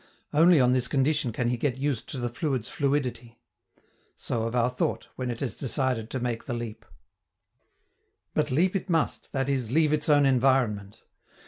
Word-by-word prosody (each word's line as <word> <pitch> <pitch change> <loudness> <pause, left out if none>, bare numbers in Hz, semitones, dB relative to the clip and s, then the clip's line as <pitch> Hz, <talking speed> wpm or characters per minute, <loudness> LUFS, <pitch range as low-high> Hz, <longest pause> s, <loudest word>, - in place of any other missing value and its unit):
Only 165 +1 +6
on 125 -1 +4
this 130 -2 +1
condition 140 -1 +1
can 120 +2 -1
he 120 - 0
get 130 +1 -1
used 140 -3 -2
to - - -4
the 120 -1 -1
fluid's 125 -1 -2
fluidity. 125 -5 -2 0.8
So 115 -1 -2
of 115 - -4
our 120 -1 +3
thought, 125 - -2
when 130 -1 -3
it 120 -1 -5
has 135 - -2
decided 125 -3 -1
to 130 - -3
make 120 -2 -3
the 120 - -3
leap. 115 -2 -7 1.5
But 150 -1 +1
leap 175 +9 +2
it 195 - -2
must, 165 -2 -1
that 135 -2 -1
is, 130 -5 -1
leave 155 +3 +3
its 150 0 0
own 145 -1 +5
environment. 125 -6 +1
130 Hz, 180 wpm, -27 LUFS, 120-145 Hz, 1.5 s, Only